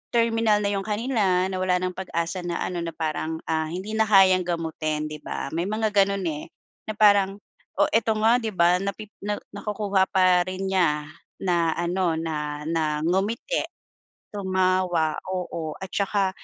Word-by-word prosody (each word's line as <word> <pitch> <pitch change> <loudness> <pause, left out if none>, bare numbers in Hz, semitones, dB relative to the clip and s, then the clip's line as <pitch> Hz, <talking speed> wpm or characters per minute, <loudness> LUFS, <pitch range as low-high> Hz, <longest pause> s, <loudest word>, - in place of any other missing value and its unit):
terminal 225 -2 +3
na 200 - +1
'yong 195 +1 -2
kanila, 205 -5 +1
na 185 - -3
wala 185 -1 +2
nang 185 0 -1
pag-asa 180 -1 -3
na 175 -1 -3
ano 180 -1 -3
na 165 -1 -5
parang, 160 0 -3
ah, 160 -1 -1
hindi 185 +6 -5
na 220 0 +1
kayang 185 -3 +5
gamutin, 155 -2 -2
'di 150 - -6
ba? 140 - -5
May 170 +3 -1
mga 215 0 0
gano'n 200 -1 +2
eh, 150 +2 -7 0.4
na 215 - -4
parang 200 -2 +4 0.4
o - - +4
eto 225 -1 +2
nga 225 +3 +4
'di 225 -2 -3
ba, 175 +1 +4
napi 200 +2 -5
na 205 +1 -2 0.2
nakukuha 200 -2 0
pa 185 -1 +3
rin 190 +1 -3
niya 160 -5 +2 0.4
na 170 -3 +2
ano 175 0 0
na 150 -2 -3
na 155 -2 0
ngumiti, 205 - 0 0.7
tumawa, 185 -4 +1 0.2
oo. 170 -4 -3
At 190 - -6
saka 200 -1 +1
185 Hz, 165 wpm, -25 LUFS, 170-205 Hz, 0.7 s, kayang